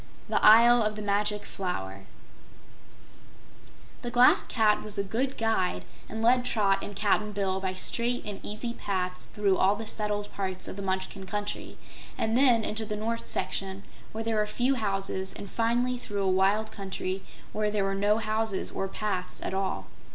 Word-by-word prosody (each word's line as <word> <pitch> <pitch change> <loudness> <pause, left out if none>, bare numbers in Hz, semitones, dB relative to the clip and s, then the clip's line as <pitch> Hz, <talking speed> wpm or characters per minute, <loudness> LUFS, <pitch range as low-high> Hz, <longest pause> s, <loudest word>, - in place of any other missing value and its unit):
9. - - +2
The - - -10
Isle 235 +2 +8
of 215 -1 0
the 210 - -5
Magic 205 +1 0
Flower 95 - -4 2.0
The 240 - -3
Glass 245 +1 +5
Cat 215 -3 +3
was 210 -1 -4
a 200 - +1
good 250 +7 -2
guide 225 -5 0 0.3
and 220 +1 -4
led 245 +2 +5
Trot 205 -5 +2
and 205 - -6
Cap'n 210 +1 +1
Bill 190 -1 0
by 190 -1 -2
straight 240 +6 -1
and 205 -2 -5
easy 225 +3 -4
paths 185 -4 -2
through 200 -2 +1
all 195 +2 +4
the 225 +1 -6
settled 210 -1 -2
part 185 -1 -2
of - - -5
the 200 - -6
Munchkin 190 0 -3
Country, 205 +2 -4 0.4
and 220 +1 0
then 245 -3 +5
into 215 +1 -2
the 210 -1 -3
north 230 +2 -3
section 195 0 -3 0.3
where 225 +1 -4
there 225 -1 0
were 210 0 +2
few 250 +5 +1
houses, 195 -4 -2
and 200 - -8
finally 240 +2 +1
through 205 -4 -3
a - - +1
wild 195 +3 +2
country 190 -1 -4 0.3
where 210 0 +1
there 210 -1 0
were 195 0 0
no 205 +2 +2
houses 220 -2 -1
or 195 - -2
paths 190 -2 -3
at - - -3
all. 190 0 -1
210 Hz, 180 wpm, -28 LUFS, 195-225 Hz, 2.0 s, Isle